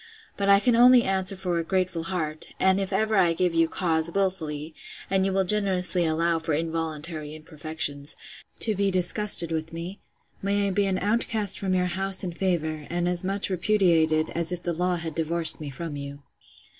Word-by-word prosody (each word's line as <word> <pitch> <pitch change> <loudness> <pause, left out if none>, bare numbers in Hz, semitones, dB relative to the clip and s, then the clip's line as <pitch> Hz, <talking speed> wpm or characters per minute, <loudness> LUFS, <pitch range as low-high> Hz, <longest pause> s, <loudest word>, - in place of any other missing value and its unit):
But 200 0 -1
I 200 0 +7
can 240 +2 +2
only 245 +1 +6
answer 190 -1 +1
for 180 -2 -2
a - - -2
grateful 180 -2 -2
heart; 155 -4 -4
and 190 +1 +3
if 195 0 -3
ever 215 +3 0
I 175 -3 +3
give 180 0 -1
you 165 0 +2
cause, 160 -2 -1
wilfully, 165 -5 -3 0.4
(and 190 0 +2
you - - -1
will 190 0 +1
generously 185 -3 +1
allow 165 +1 0
for 160 -1 -3
involuntary 160 -1 -5
imperfections,) 155 -2 -2 0.4
to 220 - +2
be 200 0 0
disgusted 185 -1 +3
with 160 0 -4
me, 170 +4 -7 0.4
may 200 +1 0
I - - -1
be 200 +1 0
an 190 -1 -1
outcast 210 0 +1
from 190 -2 -1
your 180 0 +1
house 190 +2 +4
and 175 -2 -5
favour, 160 -5 -2
and 175 0 -2
as 180 0 +1
much 195 +1 -2
repudiated, 170 -5 +1
as 170 +1 -2
if 180 -1 -5
the 175 - -2
law 180 +2 -1
had 165 -2 -5
divorced 165 +1 +2
me 150 - -6
from 160 +2 -7
you! 140 0 -8
175 Hz, 190 wpm, -25 LUFS, 160-195 Hz, 0.4 s, I